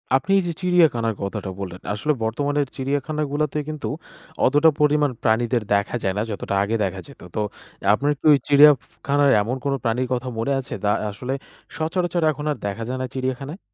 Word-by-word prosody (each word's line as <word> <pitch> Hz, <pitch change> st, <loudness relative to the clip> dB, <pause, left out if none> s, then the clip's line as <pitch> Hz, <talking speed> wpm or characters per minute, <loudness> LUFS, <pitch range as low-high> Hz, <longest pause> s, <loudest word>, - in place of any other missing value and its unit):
আপনি 135 Hz, +9 st, 0 dB
এই -, -, -1 dB
যে 170 Hz, -, -2 dB
চিড়িয়াখানার 160 Hz, -, +3 dB
কথাটা 100 Hz, 0 st, -4 dB
বললেন, 90 Hz, -2 st, -6 dB
আসলে 150 Hz, +9 st, 0 dB
বর্তমানের 145 Hz, +5 st, 0 dB
চিড়িয়াখানাগুলোতে 145 Hz, +2 st, -1 dB
কিন্তু, 155 Hz, -1 st, -4 dB, 0.6 s
অতটা 145 Hz, +5 st, +5 dB
পরিমাণ 150 Hz, 0 st, +3 dB
প্রাণীদের 115 Hz, +1 st, +2 dB
দেখা 100 Hz, +3 st, +1 dB
যায় 95 Hz, -1 st, 0 dB
না, -, -, +1 dB
যতটা 100 Hz, -1 st, -3 dB
আগে 105 Hz, +3 st, -1 dB
দেখা 95 Hz, -1 st, -2 dB
যেত। 140 Hz, -, -15 dB
তো 110 Hz, -, 0 dB, 0.5 s
আপনার 145 Hz, +7 st, +1 dB
কি -, -, -47 dB
ওই -, -, +6 dB
চিড়িয়া 145 Hz, +1 st, +8 dB
ফু -, -, -25 dB, 0.2 s
খানার, 140 Hz, 0 st, +4 dB
এমন 115 Hz, +5 st, -2 dB
কোনো 140 Hz, -1 st, +1 dB
প্রাণীর 120 Hz, +2 st, 0 dB
কথা 125 Hz, +1 st, -2 dB
মনে 115 Hz, +5 st, -1 dB
আছে? 130 Hz, -, -7 dB
দা 105 Hz, -, +3 dB, 0.2 s
আসলে 125 Hz, +6 st, -4 dB, 0.4 s
সচরাচর 175 Hz, +2 st, -1 dB
এখন 150 Hz, 0 st, -6 dB
আর 145 Hz, -, -3 dB
দেখা 100 Hz, +3 st, -4 dB
যায় 130 Hz, -, -2 dB
না -, -, -1 dB
চিড়িয়াখানায়? 130 Hz, +5 st, -4 dB
135 Hz, 185 wpm, -22 LUFS, 115-150 Hz, 0.6 s, চিড়িয়া